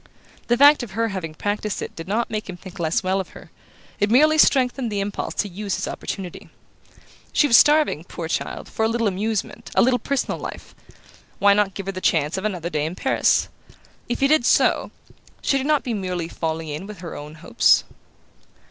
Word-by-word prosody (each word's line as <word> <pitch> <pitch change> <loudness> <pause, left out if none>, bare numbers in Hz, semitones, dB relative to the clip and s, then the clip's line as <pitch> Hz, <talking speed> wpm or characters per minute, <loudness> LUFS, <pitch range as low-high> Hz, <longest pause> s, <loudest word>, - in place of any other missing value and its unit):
The 240 - +2
fact 285 +2 +7
of 230 -6 -7
her 225 +2 0
having 170 -6 -5
practised 205 +2 -2
it - - -6
did 165 - -8
not 225 +4 -1
make 215 -2 -4
him 180 - -6
think 185 +1 -12
less 170 +7 0
well 190 +1 +1
of 190 - -5
her; - - -15 0.5
it 205 - +2
merely 305 +6 +5
strengthened 255 -4 +3
the 205 - -1
impulse 200 0 -3
to - - 0
use 200 +1 -4
his - - -3
opportunity. 185 -4 -6 0.8
She - - +3
was 250 -5 +4
starving, 295 - +4
poor 170 -2 -6
child, - - -3
for 220 - -3
a - - +4
little 230 0 0
amusement, 215 +3 -3
a - - +5
little 250 0 +3
personal 280 -1 -2
life - - -8 0.6
why 200 0 +5
not 200 -2 +1
give 195 - -5
her 195 - -2
the 185 -1 -7
chance 155 -3 +1
of 190 +2 -4
another 180 -5 -3
day 150 -1 -1
in 170 - -6
Paris? 265 - +2 0.6
If 240 - -2
he 275 - +5
did 305 -3 +3
so, - - +3 0.5
should 275 - +2
he - - -3
not 300 0 +2
be 245 - -3
merely 180 -5 -3
falling 160 -1 -4
in 155 +6 -5
with 210 -4 -10
her 170 - -7
own 150 +1 -9
hopes? 155 - +3
205 Hz, 205 wpm, -22 LUFS, 180-240 Hz, 0.8 s, fact